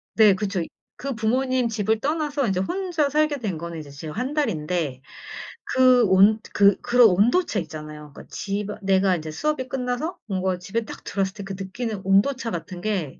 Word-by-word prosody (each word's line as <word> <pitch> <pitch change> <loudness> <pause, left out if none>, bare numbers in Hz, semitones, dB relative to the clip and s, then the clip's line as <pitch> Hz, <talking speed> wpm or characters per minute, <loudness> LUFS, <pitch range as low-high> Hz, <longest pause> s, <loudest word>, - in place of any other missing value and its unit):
네, 215 -3 +7
그쵸. 195 -1 -2 0.4
그 275 -1 -4
부모님 250 +2 +1
집을 220 0 0
떠나서 295 -1 0
인제 190 -2 0
혼자 350 - -1
살게 305 0 +1
된 200 -8 -3
거는 170 +1 -6
인제 150 -2 -8
지금 150 +2 -8
1 255 +5 -2
달인데 160 - -1 0.6
그 255 -1 +4
온 195 +4 +5
그 200 -1 +5
그런 245 -2 +6
온도차 220 - +2
있잖아요. 150 -2 -8
그니까 - - -12
집 200 0 -3 0.2
내가 190 -1 +3
인제 155 -2 -5
수업이 295 - -2
끝나서 255 +6 -3
뭔가 185 -2 -1
집에 215 +5 -3
딱 - - -10
들어왔을 190 -1 -2
때 205 -1 -8
그 195 0 -6
느끼는 205 +2 -4
온도차 230 +6 +2
같은 175 0 -6
게 185 -9 -3
210 Hz, 335 characters per minute, -24 LUFS, 185-255 Hz, 0.6 s, 네